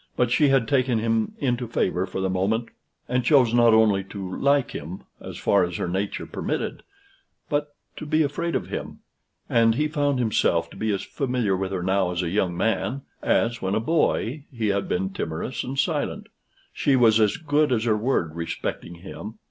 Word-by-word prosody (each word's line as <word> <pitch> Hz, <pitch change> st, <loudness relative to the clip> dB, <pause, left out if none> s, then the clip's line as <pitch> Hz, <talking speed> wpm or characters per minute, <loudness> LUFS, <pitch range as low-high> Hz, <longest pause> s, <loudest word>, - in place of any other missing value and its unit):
But 125 Hz, -1 st, +1 dB
she 145 Hz, +4 st, +4 dB
had 135 Hz, -4 st, +3 dB
taken 130 Hz, -2 st, +2 dB
him 115 Hz, 0 st, 0 dB
into 125 Hz, -3 st, -1 dB
favor 95 Hz, -4 st, 0 dB
for 95 Hz, -, -4 dB
the 95 Hz, -, +1 dB
moment, 105 Hz, +5 st, 0 dB, 0.4 s
and 125 Hz, 0 st, 0 dB
chose 125 Hz, -4 st, +4 dB
not 120 Hz, -1 st, +6 dB
only 110 Hz, -3 st, +4 dB
to 95 Hz, -2 st, -6 dB
like 140 Hz, -2 st, +2 dB
him, 85 Hz, +6 st, -7 dB, 0.2 s
as -, -, -8 dB
far 100 Hz, -, +3 dB
as 85 Hz, -1 st, -3 dB
her -, -, -2 dB
nature 95 Hz, +3 st, -2 dB
permitted, -, -, -3 dB, 0.7 s
but 145 Hz, -1 st, -1 dB, 0.2 s
to 155 Hz, -, -6 dB
be 155 Hz, +1 st, +3 dB
afraid 165 Hz, +4 st, -2 dB
of -, -, -2 dB
him; -, -, -6 dB, 0.5 s
and 115 Hz, -1 st, +3 dB
he 150 Hz, +4 st, +1 dB
found 145 Hz, -2 st, 0 dB
himself 85 Hz, -8 st, +1 dB
to -, -, -12 dB
be 110 Hz, 0 st, -1 dB
as 100 Hz, -, -2 dB
familiar 125 Hz, -8 st, -1 dB
with 95 Hz, 0 st, -3 dB
her 95 Hz, -2 st, -2 dB
now 95 Hz, 0 st, +1 dB
as 90 Hz, 0 st, -2 dB
a 85 Hz, -, -1 dB
young 90 Hz, -2 st, 0 dB
man, 110 Hz, +6 st, -1 dB, 0.2 s
as, 120 Hz, 0 st, +1 dB
when 95 Hz, +1 st, 0 dB
a -, -, +2 dB
boy, 145 Hz, 0 st, 0 dB
he 115 Hz, -5 st, -1 dB
had 100 Hz, 0 st, -1 dB
been 95 Hz, +2 st, -1 dB
timorous 85 Hz, +8 st, -4 dB
and 135 Hz, +2 st, -5 dB
silent. -, -, -1 dB, 0.4 s
She 140 Hz, -, +2 dB
was 115 Hz, -3 st, +5 dB
as 105 Hz, -2 st, +3 dB
good 150 Hz, -2 st, +1 dB
as 115 Hz, -3 st, +1 dB
her 115 Hz, -2 st, +2 dB
word 105 Hz, -8 st, 0 dB
respecting 85 Hz, +1 st, -4 dB
him. 105 Hz, +3 st, -8 dB
115 Hz, 195 wpm, -24 LUFS, 95-130 Hz, 0.7 s, not